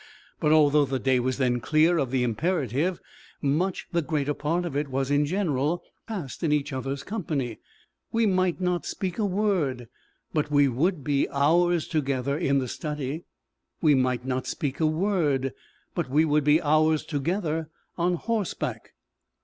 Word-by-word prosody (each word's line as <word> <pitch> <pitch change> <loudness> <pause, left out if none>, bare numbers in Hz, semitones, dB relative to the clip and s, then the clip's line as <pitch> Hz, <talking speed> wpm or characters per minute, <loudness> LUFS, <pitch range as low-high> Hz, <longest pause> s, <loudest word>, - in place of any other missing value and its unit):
But 150 - +2
although 150 -1 +5
the 135 0 -2
day 130 -1 +2
was 130 +1 -1
then 125 -3 +1
clear 160 +7 +3
of 135 -4 0
the 130 -1 +1
imperative, 150 - 0 0.4
much 160 +7 0
the 170 -1 +1
greater 145 -2 -1
part 165 +5 -1
of 160 -5 -4
it 145 +1 0
was 135 +1 -2
in 145 0 +3
general 165 -3 0 0.2
passed 185 - -5
in 160 - +1
each 145 -1 0
other's 135 +2 -3
company. 150 - -3 0.5
We 230 0 +2
might 185 -3 +1
not 180 -1 0
speak 185 +1 -3
a 215 - +2
word, 180 - 0 0.4
but 150 -2 0
we 145 -1 +4
would 145 +5 0
be 140 0 +1
hours 170 +4 +2
together 140 -3 -1
in 140 -3 +1
the 130 -2 0
study. 150 +2 -4 0.5
We 155 -3 +4
might 130 -2 +1
not 130 -1 -2
speak 140 -5 -3
a 160 - +3
word, 155 - +1 0.4
but - - -2
we 150 +4 +4
would 150 -1 +2
be 150 +2 +5
hours 155 +1 +3
together 160 +1 -2 0.3
on 175 +1 +1
horseback. 215 +1 -3
150 Hz, 165 wpm, -26 LUFS, 135-175 Hz, 0.5 s, although